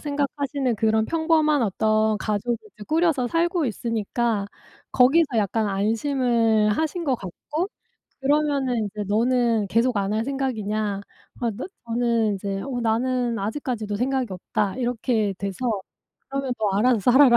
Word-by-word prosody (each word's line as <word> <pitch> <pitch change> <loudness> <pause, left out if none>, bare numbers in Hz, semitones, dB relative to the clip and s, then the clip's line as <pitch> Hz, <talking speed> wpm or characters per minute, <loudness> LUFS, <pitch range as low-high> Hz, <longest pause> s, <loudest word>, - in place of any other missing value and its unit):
생각하시는 285 -3 -1
그런 220 +1 +2
평범한 315 0 +2
어떤 215 +1 +2
가족을 215 +3 -1 0.2
이제 210 - -12
꾸려서 315 -5 +2
살고 335 +3 +1
있으니까 225 -1 -1 0.4
거기서 275 +1 +4
약간 215 +1 +1
안심을 225 +1 +2
하신 320 - -1
것 275 -4 +2
같고 295 - -4 0.5
그러면은 275 -5 +1
이제 210 +1 -5
"너는 230 0 +2
계속 230 +3 +2
안 200 +1 0
할 220 +1 0
생각이냐." 215 -7 -2 0.4
아 235 - +1
나 225 +4 -6 0.2
저는 230 -3 +1
이제 195 0 -3
"어 255 -3 -3
나는 240 +1 0
아직까지도 215 -1 -3
생각이 255 -1 -1
없다." 195 +3 -2
이렇게 235 -4 0
돼서 195 -1 -4 0.7
"그러면 270 -2 -2
너 200 -3 +1
알아서 245 +2 +4
살아라." 260 -2 +7
235 Hz, 310 characters per minute, -24 LUFS, 215-270 Hz, 0.7 s, 살아라